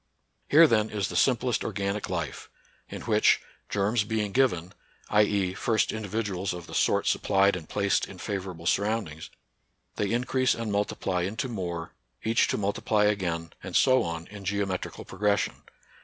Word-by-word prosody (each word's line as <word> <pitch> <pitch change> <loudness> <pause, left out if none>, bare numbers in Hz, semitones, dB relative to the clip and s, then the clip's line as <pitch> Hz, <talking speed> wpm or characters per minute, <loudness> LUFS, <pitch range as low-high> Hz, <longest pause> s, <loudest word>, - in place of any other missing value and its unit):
Here, 160 +3 +8
then, 110 -6 +2
is 100 -4 -2
the - - -6
simplest 125 -2 +2
organic 100 0 -2
life, 85 -6 -4 0.2
— - - -35
in - - -7
which, - - +4 0.3
germs 105 +3 +1
be 110 0 -1
ing 100 - -6
given, 95 -9 +2 0.4
t. 105 - +6
e. 100 -3 +1
first 110 +2 +1
individuals 105 -3 -2
of 90 -1 -7
the - - -11
sort - - +2
sup - - +1
plied 100 0 +3
and 80 -4 -8
placed 100 -1 +1
in 95 - -11
favorable 95 -4 -5
surroundings, 100 -6 -1 0.7
they 100 - 0
increase 125 +2 +1
and 115 -2 -3
multiply 100 -2 -1
into 100 +8 -2
more, 85 -7 -4 0.3
each 115 +2 +3
to - - -1
multiply 105 +1 +1
again, 85 -5 -1
and - - -7
so 130 -1 +5
on, 85 0 -4
in 105 -1 -9
geometrical 100 -1 -3
pro - - -12
gression. 105 -1 +1
100 Hz, 170 wpm, -27 LUFS, 90-110 Hz, 0.7 s, Here